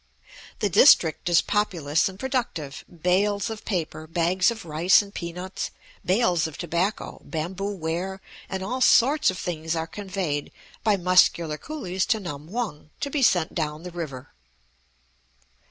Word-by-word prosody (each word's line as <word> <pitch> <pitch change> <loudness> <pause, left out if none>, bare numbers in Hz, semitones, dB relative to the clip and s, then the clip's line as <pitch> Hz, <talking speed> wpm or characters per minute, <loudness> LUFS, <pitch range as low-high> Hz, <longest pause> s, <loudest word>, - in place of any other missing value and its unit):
The 205 - +2
district 175 - +5
is 170 -1 +5
populous 170 -7 +1
and 190 - -11
productive; 230 - -3 0.2
bales 200 +4 +2
of 220 - -7
paper, 160 -5 -3
bags 175 +3 +2
of 225 -4 -6
rice 165 +4 +4
and 200 0 -13
peanuts, 180 +1 -5 0.3
bales 180 -4 +2
of 160 - -10
tobacco, 175 +4 -2
bamboo 180 +5 -4
ware, 180 +3 -3 0.3
and 190 0 -3
all 255 +7 -3
sorts 265 +4 +5
of 185 - -3
things 160 -1 -3
are 160 0 -1
conveyed 180 -5 -4 0.3
by 210 -2 +3
muscular 170 -4 +3
coolies 190 -12 -3
to 225 - +2
Nam 155 -4 -7
hung 210 -11 -4
to 280 -2 -3
be 290 - 0
sent 175 -9 +3
down 155 -1 -3
the 180 - -7
river. 155 -7 -7
180 Hz, 145 wpm, -25 LUFS, 160-205 Hz, 0.3 s, district